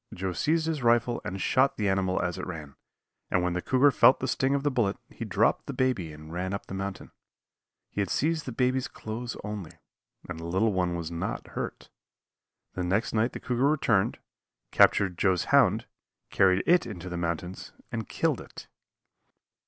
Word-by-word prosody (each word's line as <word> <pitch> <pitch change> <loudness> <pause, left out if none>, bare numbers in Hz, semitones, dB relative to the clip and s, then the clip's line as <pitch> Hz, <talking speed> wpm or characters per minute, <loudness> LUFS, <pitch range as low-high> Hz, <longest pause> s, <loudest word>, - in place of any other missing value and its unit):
Joe 95 0 -3
seized 160 - +1
his 160 -3 -2
rifle 120 0 +2
and 95 +1 -5
shot 130 +7 +2
the 105 - 0
animal 95 -1 +1
as 90 +1 -2
it 95 - -5
ran, 80 -5 -7 0.6
and 90 - +1
when 90 -1 0
the 90 - -2
cougar 135 +6 +4
felt 130 - +6
the 130 - -2
sting 135 +1 +1
of 140 - -1
the 145 - +1
bullet 115 -7 +1
he - - -7
dropped - - +1
the - - -4
baby 125 -11 0
and 75 +1 -11
ran 95 +3 -2
up - - -7
the - - -9
mountain. 95 0 -5 0.8
He 100 - -1
had 100 - -2
seized 160 +1 0
the - - -3
baby's 125 +2 +1
clothes 115 +3 -6
only, 105 -5 -6 0.5
and - - -6
the 80 - -7
little 100 +5 +1
one 90 -2 0
was 85 -1 -4
not 85 - -4
hurt. - - -6 0.8
The 90 - -3
next 95 +6 0
night 115 +2 +1
the - - -5
cougar 125 +3 +1
returned, 115 -10 +2 0.5
captured 95 -3 +4
Joe's 95 -3 +2
hound, - - +5 0.5
carried 95 -1 +4
it 175 -6 +4
into 95 -5 -7
the 90 - -5
mountains 85 +1 -4 0.2
and 115 -2 -4
killed - - 0
it. - - -11
100 Hz, 185 wpm, -28 LUFS, 90-125 Hz, 0.8 s, felt